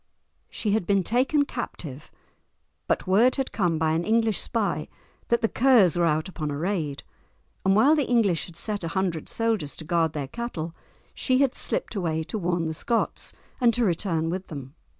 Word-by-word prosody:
She 210 - -2
had 210 -4 0
been 200 -2 +3
taken 265 - +2
captive, 155 - -6 0.8
but - - 0
word 215 +7 +4
had 270 -1 -2
came 175 -6 +1
by 160 0 +1
an 165 +2 0
English 225 0 +2
spy 225 -4 -1 0.4
that 235 - +2
the 225 - +3
Kers 230 - +4
were 175 -1 +3
out 155 +1 +1
upon 155 -5 -4
a 145 - -3
raid, 160 -4 -2 0.6
and 190 0 +3
while 270 +9 +6
the 290 -6 0
English 210 -9 +2
had 175 - -13
set 205 +3 -2
a - - -2
hundred 175 -5 -1
soldiers 225 -10 0
to - - -8
guard 165 -1 +1
their 145 -3 -3
cattle 170 - -5 0.4
she 255 -1 +1
had 275 -2 +3
slipped - - -1
away 165 -6 -1
to 215 - -4
warn 175 -2 0
the 160 - -2
Scots 230 +8 -1 0.3
and 235 -3 +4
to 240 - +2
return 165 -3 0
with 185 +1 -4
them. 140 -3 -8
190 Hz, 190 wpm, -26 LUFS, 160-230 Hz, 0.8 s, while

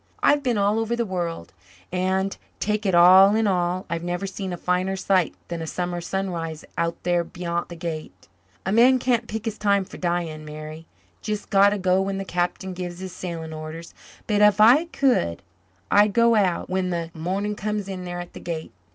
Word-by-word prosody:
"I've 290 0 +4
been 250 -5 0
all 205 +2 +2
over 225 +1 -1
the 235 0 -1
world 170 - -4 0.4
and, 190 +2 0 0.2
take 210 0 -1
it 190 - +2
all 185 +4 +8
in 220 0 +2
all, 180 -1 0
I've 170 0 -3
never 175 +2 -2
seen 195 -1 -5
a 175 - -4
finer 180 +2 0
sight 185 -2 +1
than 170 -1 -5
a 160 - -5
summer 175 +1 -3
sunrise 170 -4 -4
out 170 0 -1
there 175 -1 +2
beyant 170 0 -4
the 175 - -7
Gate. 155 - -7 0.4
A 190 - 0
man 245 +4 +6
can't 240 -2 0
pick 220 +1 -5
his 225 -2 -4
time 200 -2 +2
for - - -11
dying, 170 -3 -2
Mary 155 +1 -9 0.3
jest 210 -1 -4
got 200 0 +6
to 205 - -1
go 185 0 +2
when 195 0 -2
the 195 - -4
Captain 180 +1 -2
gives 175 -1 -6
his 185 -1 -7
sailing 165 -3 -6
orders. 155 +2 -8 0.3
But 210 -1 +1
if 210 0 +5
I 245 +10 +7
could 255 - 0 0.5
I'd 205 0 +5
go 235 +1 +4
out 195 -5 +1
when 185 0 -1
the 170 -2 -3
morning 190 +6 -2
comes 210 -1 -3
in 190 -2 -5
there 175 0 -5
at 175 0 -8
the - - -9
Gate. 165 -2 -5
185 Hz, 200 wpm, -24 LUFS, 170-205 Hz, 0.5 s, all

